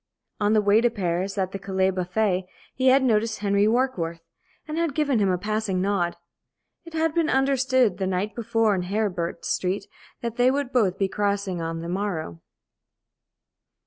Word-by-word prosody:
On 210 0 +2
the 215 -1 +3
way 205 +2 +4
to 240 - +3
Paris, 190 -2 -2
at 190 -1 -1
the 195 - -5
Calais 190 -1 0
buffet, 185 0 0 0.3
he 260 0 0
had 265 +1 +6
noticed 220 -3 +1
Henry 200 0 +2
Warkworth, 215 -9 0 0.5
and 305 - -4
had 330 -5 -1
given 285 -6 +2
him 200 -2 +2
a 180 - +1
passing 210 -1 -1
nod. 185 -3 0 0.7
It 335 - -11
had 320 -1 +1
been 330 -2 +1
understood 260 -6 +2
the 190 - 0
night 190 +3 -1
before 225 -2 +1
in 185 - 0
Heribert 180 -4 -2
Street 190 +2 -1 0.4
that 235 0 -4
they 245 +1 +5
would 275 -1 -1
both 200 -7 +2
be 195 - +1
crossing 200 -2 -1
on 165 0 -3
the 170 - -6
morrow. 175 - -3
205 Hz, 175 wpm, -25 LUFS, 185-240 Hz, 0.7 s, had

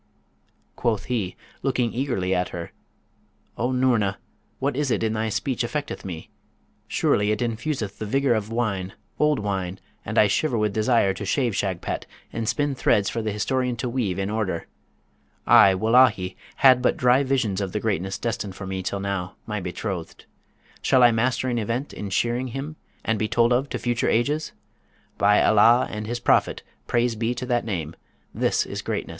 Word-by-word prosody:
Quoth 110 -4 0
he, 110 -8 -2 0.3
looking 125 -3 0
eagerly 95 -8 -1
at 90 0 0
her, 85 -1 -6 0.8
'O 125 +2 -1
Noorna, 120 -6 +2 0.4
what 140 0 -1
is 145 0 0
it 115 - 0
in 110 -1 0
thy 110 0 -1
speech 125 +3 -1
affecteth 145 +4 -3
me? 85 -4 -7 0.6
Surely 105 0 +1
it 105 - +1
infuseth 115 -2 -3
the 110 - -4
vigour 135 +2 +2
of 110 -2 -2
wine, 100 -5 -2 0.3
old 150 -1 +3
wine; 95 -2 -3 0.2
and - - -4
I - - +7
shiver 120 +5 +1
with 105 -2 0
desire 110 -2 +2
to 100 - -7
shave 120 +1 0
Shagpat, 95 -3 -2 0.3
and 115 -1 -2
spin 145 -1 0
threads 105 -6 +2
for 115 - -2
the 110 -1 -2
historian 125 +4 -1
to 120 +2 -3
weave 120 -7 -1
in 100 +1 -2
order. 105 -6 -2 0.8
I, 95 -1 +7
wullahy! 110 -2 +3 0.2
had 130 -2 +6
but 125 - +2
dry 125 +2 +4
visions 125 -8 0
of 95 -2 -3
the 105 - -2
greatness 95 -3 -1
destined 105 -4 -3
for 95 - -7
me 95 0 -3
till 100 +2 -3
now, 100 -2 -3
my 105 -1 -3
betrothed! 90 -1 -5 0.6
Shall 130 - +4
I 120 - +7
master 125 +3 0
an 120 -2 0
Event 115 +6 -3
in 100 - -5
shaving 120 +5 0
him, 135 +5 -5 0.3
and 110 -1 0
be 110 - 0
told 115 +2 +3
of 135 +3 0
to - - -3
future 120 -1 0
ages? 145 +7 0 0.7
By 105 +1 +5
Allah 115 +3 +5
and 105 0 -5
his 120 +1 -3
Prophet - - +2 0.2
(praise 120 -1 +1
be 115 +2 -1
to 125 - -4
that 120 -2 0
name!), 85 -7 -3 0.4
this - - +1
is - - -5
greatness! - - -3
110 Hz, 180 wpm, -24 LUFS, 100-125 Hz, 0.8 s, I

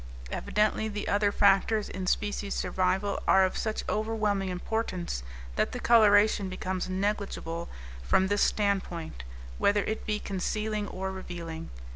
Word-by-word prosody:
Evidently 215 +1 +1
the 210 -1 -4
other 205 0 +2
factors 205 +2 +3
in 185 0 -5
species 205 0 -1
survival 190 +2 0
are 190 0 +6
of 185 - -2
such 220 -1 -2
overwhelming 215 -3 0
importance 180 - -3 0.4
that - - +1
the - - -4
coloration 210 -3 +5
becomes 185 0 -3
negligible 190 -4 -2 0.3
from - - +3
this 205 +1 +1
standpoint, 185 - 0 0.4
whether 205 0 +3
it 220 - -4
be 210 -1 +1
concealing 210 +2 -2
or 190 0 -4
revealing. 170 -3 -7
200 Hz, 130 wpm, -29 LUFS, 185-210 Hz, 0.4 s, are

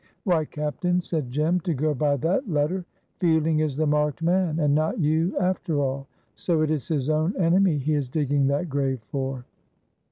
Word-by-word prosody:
"Why, 170 -6 +2
captain," 150 +5 -1
said 160 -7 -3
Jem, 155 +7 +1
"to 175 -3 -2
go 150 +3 0
by 145 0 +1
that 185 - 0
letter, 165 +4 0 0.3
Fielding 160 -2 +2
is 150 -3 -1
the 155 - +1
marked 150 +1 0
man, 175 -2 +1
and 150 -3 +2
not 155 +2 +1
you 160 +3 +1
after 180 -4 0
all. 135 0 -2 0.3
So 165 -3 0
it 155 - 0
is 155 0 -2
his 145 -6 -1
own 155 +5 +1
enemy 180 -1 +3
he 145 +3 -1
is 145 -4 -1
digging 145 -1 +1
that 140 +5 0
grave 135 -4 -1
for." 130 -2 -3
155 Hz, 185 wpm, -25 LUFS, 145-170 Hz, 0.3 s, enemy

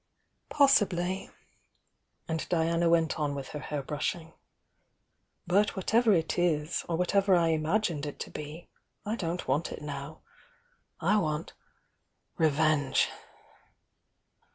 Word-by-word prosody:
Possibly! 195 -10 +2 1.0
and 160 -1 -3
Diana 170 0 +2
went 165 -1 +2
on 145 -2 -1
with 140 -1 -6
her 150 - -6
hair 145 -1 -4
brushing. 160 +3 -3 1.1
"But 200 +4 +2
whatever 220 +4 +3
it 165 -2 +1
is, 160 -2 0
or 165 - +1
whatever 195 +2 +3
I 165 -1 +3
imae 160 +8 +1
med 150 -4 -4
It 145 - -7
to - - -6
be, 150 +3 -8 0.4
I 215 +2 -1
don't 175 -4 -3
want 140 +5 0
it - - -7
now. 145 +1 -7 0.8
I 215 - +3
want— 155 -5 -2 0.9
re 160 -1 +5
venge! 150 -2 +2
165 Hz, 125 wpm, -29 LUFS, 150-180 Hz, 1.1 s, re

